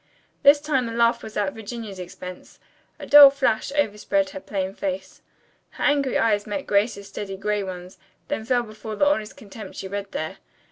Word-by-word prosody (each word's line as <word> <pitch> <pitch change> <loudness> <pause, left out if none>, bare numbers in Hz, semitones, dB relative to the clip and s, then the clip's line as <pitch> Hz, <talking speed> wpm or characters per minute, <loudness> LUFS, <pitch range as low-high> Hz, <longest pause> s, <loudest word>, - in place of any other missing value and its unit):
This 285 +1 +7
time 280 -5 0
the 230 - -5
laugh 235 0 +2
was 220 - -8
at 200 -2 0
Virginia's 220 -3 -7
expense. 180 0 -9 0.4
A - - -8
dull 290 -1 +10
flush 275 -3 0
overspread 205 -7 0
her - - -7
plain 190 -1 -3
face. 285 +4 -5 0.6
Her - - -4
angry 280 -3 +2
eyes 210 -2 +1
met 245 +7 -3
Grace's 200 0 0
steady 195 -2 -6
gray 210 +1 -1
ones, 180 -1 -8 0.3
then 290 -7 -3
fell 245 +1 +1
before 215 -1 -8
the 290 - +2
honest 220 -8 0
contempt 205 -1 -10
she 190 - -6
read 200 0 -5
there. 155 - -4
215 Hz, 180 wpm, -24 LUFS, 195-255 Hz, 0.6 s, dull